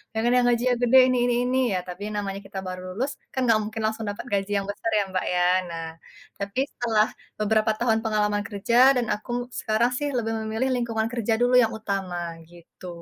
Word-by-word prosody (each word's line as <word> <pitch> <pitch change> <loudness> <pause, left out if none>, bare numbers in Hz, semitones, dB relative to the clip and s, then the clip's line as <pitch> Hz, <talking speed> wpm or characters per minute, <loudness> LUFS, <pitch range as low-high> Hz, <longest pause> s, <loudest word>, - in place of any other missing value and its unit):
Jangan 230 +2 +1
yang 245 - +3
gajinya 245 +1 +2
gede 245 +2 +5
ini 255 - +1
ini 245 - +2
ini, 255 +1 0 0.2
ya, - - +2
tapi 180 +3 -7
namanya 195 -1 -3
kita 195 - -6
baru 185 0 -5 0.2
lulus, 265 +6 -1 0.2
kan 260 - -2
enggak 225 -3 +4
mungkin 220 +1 -5
langsung 220 0 -2
dapat 205 - -8
gaji 200 0 0
yang 195 - -2
besar 225 +2 -4
ya, 210 - +4
Mbak, 185 - -1
ya. 180 - +2 0.3
Nah, 165 -1 -5 0.5
tapi 200 +5 -3
setelah 220 -3 +1 0.3
beberapa 215 +1 +2
tahun 225 -2 +2
pengalaman 210 -1 +1
kerja 240 +6 +4
dan 245 - +1
aku 245 +3 -3
sekarang 225 +3 +1
sih 290 - -1
lebih 225 -1 -1
memilih 220 +4 -2
lingkungan 230 -2 -1
kerja 235 -2 0
dulu 245 +1 +3
yang 225 - 0
utama, 195 -4 -3 0.3
gitu. 175 +1 -14
220 Hz, 200 wpm, -25 LUFS, 205-240 Hz, 0.5 s, gede